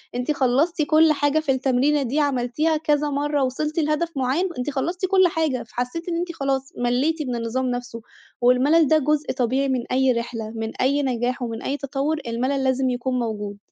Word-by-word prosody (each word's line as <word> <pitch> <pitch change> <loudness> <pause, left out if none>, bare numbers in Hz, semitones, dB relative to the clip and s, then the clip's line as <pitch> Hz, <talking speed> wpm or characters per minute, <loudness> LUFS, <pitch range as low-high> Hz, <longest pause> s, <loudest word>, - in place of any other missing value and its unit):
أنتِ 250 +4 -1
خلَّصتِ 290 +5 +1
كُلّ 310 +1 +4
حاجة 290 +1 +1
في 310 -3 0
التمرينة 270 +2 +2
دي، 265 +4 -1
عَملتيها 285 +3 +1
كذا 300 -1 +1
مَرَّة، 290 0 0
وِصِلتِ 300 +5 -2
لهدف 305 +2 0
مُعيّن، 270 +9 0
أنتِ 250 +3 -2
خلَّصتِ 340 +7 -2
كُلّ 375 -1 +4
حاجة، 320 -7 -1
فحسِّيتِ 250 +10 -4
إن 340 - -1
أنتِ 345 0 -2
خلاص 270 -3 -2
مَلِّيتِ 260 +7 0
من 250 -3 -3
النظام 235 +3 -2
نفسُه، 245 -1 -5 0.4
والمَلَل 270 +6 +4
ده 315 - +4
جُزء 300 +1 0
طبيعي 260 +2 0
من 255 -2 0
أي 260 +1 +3
رحلة، 230 -2 -4
من 225 0 -3
أي 280 +3 +2
نجاح 250 -1 -1
ومن 230 -1 -4
أي 280 - -2
تَطوُّر، 285 +2 -2
المَلَل 260 +4 -1
لازم 260 0 +1
يكون 250 +1 -1
موجود. 210 -3 -4
270 Hz, 185 wpm, -23 LUFS, 250-305 Hz, 0.4 s, كُلّ